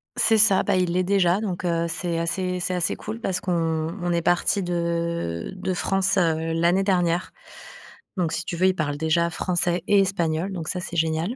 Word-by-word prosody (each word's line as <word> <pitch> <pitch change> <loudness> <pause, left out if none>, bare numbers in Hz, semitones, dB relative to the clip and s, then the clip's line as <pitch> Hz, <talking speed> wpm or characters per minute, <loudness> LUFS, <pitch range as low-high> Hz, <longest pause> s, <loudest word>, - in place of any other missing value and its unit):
C'est 225 -1 +3
ça, 195 -2 +5
bah, 200 - +1
il 180 -1 +1
l'est 185 0 +2
déjà 190 0 +2
donc 185 -4 -3
heu, 170 -1 0
c'est 170 0 -3
assez 180 +2 -1
c'est 180 +1 -2
assez 175 -2 0
cool 220 +2 -7
parce 185 -4 -2
qu'on 180 - -2 0.5
on 175 0 -1
est 170 0 +1
partis 175 +3 +1
de 170 - -2
de 185 0 -2
France, 195 +2 +1
heu, 165 -2 +1
l'année 170 +4 +2
dernière. 180 -3 +1 0.9
Donc 170 -3 0
si - - -2
tu - - -4
veux, 185 +2 +3
il 185 - +2
parle 145 -4 -2
déjà 160 +2 +1
français 175 0 -1
et 205 -1 +5
espagnol, 175 -1 -1
donc 165 -4 -5
ça 180 - -2
c'est 175 -1 -6
génial. 160 +8 0
175 Hz, 200 wpm, -24 LUFS, 170-185 Hz, 0.9 s, ça